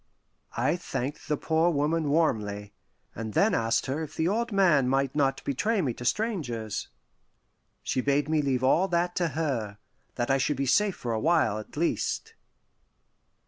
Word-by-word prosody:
I 140 +8 +1
thanked 145 -4 -5
the 150 - 0
poor 160 +3 +2
woman 155 0 0
warmly, 105 -10 0 0.4
and 110 -1 -6
then - - +4
asked 115 0 +1
her 140 +4 -2
if 155 - -7
the 160 - 0
old 230 +4 0
man 170 -10 +4
might 135 0 +1
not 135 -2 0
betray 205 - 0
me 135 -9 0
to 120 - -9
strangers. 125 - -2 1.0
She 130 - 0
bade 140 +1 +1
me 155 -1 +2
leave 130 -3 0
all 170 +8 +4
that 175 0 0
to 175 - +2
her 120 -10 -2 0.4
that 120 +1 -1
I 135 - +3
should 145 +1 0
be 140 - 0
safe 200 +9 +2
for 120 -2 -4
a 110 - 0
while, 145 -8 +2
at 110 - -11
least. 170 - -1
140 Hz, 170 wpm, -27 LUFS, 125-170 Hz, 1.0 s, then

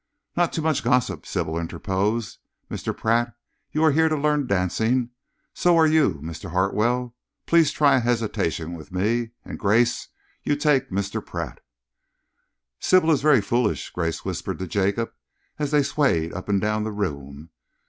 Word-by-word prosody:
"Not 175 -1 +2
too 160 - -3
much 160 -2 +1
gossip," 110 -10 +1
Sybil 80 +1 -2
interposed. 100 +6 -2 0.3
"Mr. - - -4
Pratt, 115 +1 +1 0.4
you 155 - 0
are 160 - +6
here 160 +2 +3
to 155 - 0
learn 150 -1 +1
dancing. 110 +6 +1 0.4
So 175 -1 +3
are 160 - +6
you, 155 - +3
Mr. 85 +4 -7
Hartwell. 115 +7 0 0.3
Please 165 -3 +4
try 145 -3 +4
a - - +3
hesitation 110 -9 -1
with 85 +2 -10
me, 115 +6 0 0.2
and, - - -7
Grace, 115 +4 +2 0.3
you 145 - 0
take 145 -3 +2
Mr. 100 +1 -2
Pratt." - - -6 1.2
"Sybil 185 -3 +4
is 150 - +2
very 145 -6 +5
foolish," 115 +2 -1
Grace 85 -2 -3
whispered - - -3
to 95 - -4
Jacob, 100 +5 0 0.5
as 145 -2 -1
they 150 -1 +3
swayed 85 - +1
up 95 +3 -7
and 100 -1 +3
down 105 +1 0
the 110 - -3
room. 75 -6 -5
115 Hz, 160 wpm, -24 LUFS, 95-145 Hz, 1.2 s, are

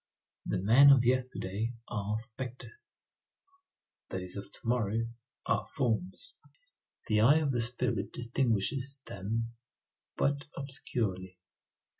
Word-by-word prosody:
The - - +1
men 115 +9 +7
of 135 -3 +7
yesterday 120 -4 0
are 105 -1 -1
spectres; 125 - -7 1.0
those 90 -1 -5
of 100 0 -7
to - - -14
morrow 115 -1 +1 0.4
are - - +1
forms. 140 - -1 0.7
The 105 -1 +3
eye 140 +8 +7
of 150 -3 +1
the 120 -2 +1
spirit 120 -3 0
distinguishes 130 +3 0
them 115 +4 -3 0.6
but 140 0 +1
obscurely. 100 -9 -3
115 Hz, 105 wpm, -32 LUFS, 105-130 Hz, 1.0 s, men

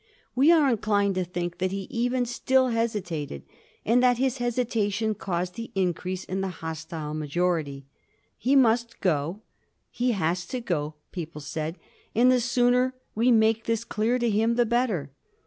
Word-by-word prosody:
We 275 +6 +5
are 315 -4 +5
inclined 205 -3 +1
to 185 0 0
think 175 0 -4
that 185 0 0
he 195 0 -4
even 245 +1 0
still 260 +2 +2
hesitated, 185 - -2 0.4
and 240 +3 +4
that 250 -1 +4
his 265 0 0
hesitation 225 -3 0
caused 180 -2 -3
the 230 +2 -7
increase 185 0 -1
in 190 +1 -3
the 195 - -1
hostile 160 -3 -6
majority. 155 -2 -1 0.5
He 265 +3 +1
must 235 -2 +3
go 170 +2 0 0.3
— - - -41
^he 245 0 +1
has 175 -2 -1
to 255 - -3
go 155 -9 -2
— - - -46
^people 165 -4 -6
said; 155 +3 -4 0.4
and 245 +3 +5
the 250 -1 +3
sooner 245 +1 +2 0.2
we 230 +4 +2
make 225 -1 +3
this 230 -1 0
clear 230 +2 0
to 240 -1 0
him 225 +2 +2
the 240 0 +3
better. 220 - 0
215 Hz, 165 wpm, -26 LUFS, 175-240 Hz, 0.5 s, We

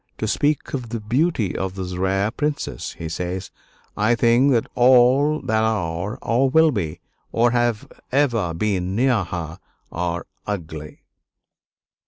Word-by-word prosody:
"To - - -2
speak 145 0 0
of 125 -4 -4
the 115 0 -3
beauty 115 - 0
of 95 0 -3
this 90 -2 -5
rare 95 +3 0
princess," 150 +4 -3
he 80 - -6
says, 90 +3 -4 0.4
"I 110 +3 +2
think 120 +4 +4
that 115 -3 +2
all 130 +4 +5
that 110 0 0
are, 100 -1 -1
or 130 +4 +2
will 160 +3 +5
be, 85 - -3 0.3
or 120 +1 +3
have 120 -3 0 0.2
ever 120 - +1
been 95 -1 -1
near 120 -3 +2
her 85 -1 -6 0.3
are 85 0 -3 0.2
ugly." 80 -7 -6
110 Hz, 140 wpm, -22 LUFS, 90-125 Hz, 0.4 s, all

